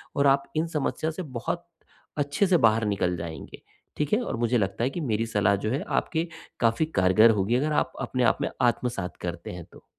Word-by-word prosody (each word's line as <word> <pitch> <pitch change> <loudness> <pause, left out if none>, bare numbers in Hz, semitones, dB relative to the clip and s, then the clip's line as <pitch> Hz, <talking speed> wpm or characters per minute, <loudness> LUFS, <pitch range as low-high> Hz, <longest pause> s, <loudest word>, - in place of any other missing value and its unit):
और 140 0 +3
आप 140 0 +4
इन 160 +2 +1
समस्या 160 0 -2
से 180 +3 -5
बहुत 170 +8 -3 0.5
अच्छे 145 +7 +1
से 180 - +4
बाहर 110 0 +3
निकल 95 -3 0
जाएँगे, 80 -1 -8 0.4
ठीक 150 +3 -1
है? 220 - +3
और - - -3
मुझे 120 +1 +1
लगता 100 +1 -1
है 125 - +2
कि 170 - -5
मेरी 115 -5 0
सलाह 105 -2 +2
जो - - 0
है 135 +4 -1
आपके 165 +1 -1 0.3
काफ़ी 115 +6 +2
कारगर 95 +5 +6
होगी, 105 +2 +1
अगर 150 +4 +1
आप 130 - +1
अपने 125 -1 -1
आप 115 - +3
में - - 0
आत्मसात 120 -6 0
करते 85 -1 -5
हैं 90 -2 -8
तो। - - -16
120 Hz, 210 wpm, -26 LUFS, 105-150 Hz, 0.5 s, कारगर